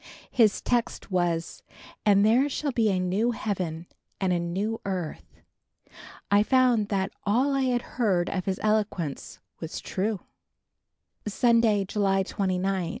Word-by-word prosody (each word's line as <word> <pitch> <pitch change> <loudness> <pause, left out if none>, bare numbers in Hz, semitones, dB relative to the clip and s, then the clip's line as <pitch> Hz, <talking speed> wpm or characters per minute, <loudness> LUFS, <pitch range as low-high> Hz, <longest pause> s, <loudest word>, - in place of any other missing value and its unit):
His 220 -5 +3
text 240 -3 -1
was 175 -2 -1 0.5
"And 200 0 +5
there 250 +6 +4
shall 285 +1 -2
be 230 -3 +2
a 190 -2 +1
new 190 +6 +1
heaven 180 -7 -3 0.3
and 190 -2 +1
a 175 - +1
new 195 +6 -2
earth." 185 -5 -5 0.9
I 205 0 +6
found 245 -2 +3
that 195 -2 -1
all 250 +7 +2
I 270 -1 +1
had 245 -1 0 0.2
heard 185 -6 +2
of 185 -2 -3
his 190 -1 -2
eloquence 210 -8 -1 0.2
was 160 0 -5
true. 200 +1 -2 1.1
Sunday, 225 -2 +3
July 195 -1 +1
29. 190 -2 -1
200 Hz, 135 wpm, -26 LUFS, 185-225 Hz, 1.1 s, I